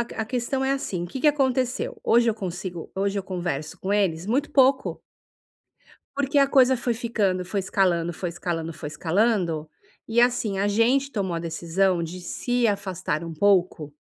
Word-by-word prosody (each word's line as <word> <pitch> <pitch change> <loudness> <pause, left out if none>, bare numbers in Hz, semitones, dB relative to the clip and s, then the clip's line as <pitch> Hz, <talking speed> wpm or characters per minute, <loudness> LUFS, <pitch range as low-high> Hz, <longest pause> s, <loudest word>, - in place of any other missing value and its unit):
a 230 -2 -3
questão 255 +3 -2
é 270 - +2
assim: 195 -11 -3
o - - -5
que 260 +9 -6
que 300 - +5
aconteceu? 260 -3 0
Hoje 235 0 +4
eu 220 - +2
consigo 180 -3 -6
hoje 200 +1 0
eu - - -2
converso 175 -5 -4
com 195 +2 -2
eles 185 -4 +1
muito 270 +7 0
pouco 270 -1 +3 1.1
porque 285 +1 0
a 275 - +5
coisa 260 -2 +4
foi 240 0 -1
ficando, 210 -6 -1
foi 195 +3 -2
escalando, 180 -3 +1
foi 175 +1 -4
escalando, 165 -1 -4
foi 150 - -7
escalando 170 0 0 0.4
e, 235 +1 +3
assim, 240 -5 +1
a 200 - +1
gente 250 +7 +2
tomou 195 -5 -2
a - - -2
decisão 170 +2 0
de 175 +2 -6
se 245 +6 -1
afastar 190 -6 -2
um 165 -1 -6
pouco 175 -4 +1
200 Hz, 175 wpm, -24 LUFS, 175-245 Hz, 1.1 s, que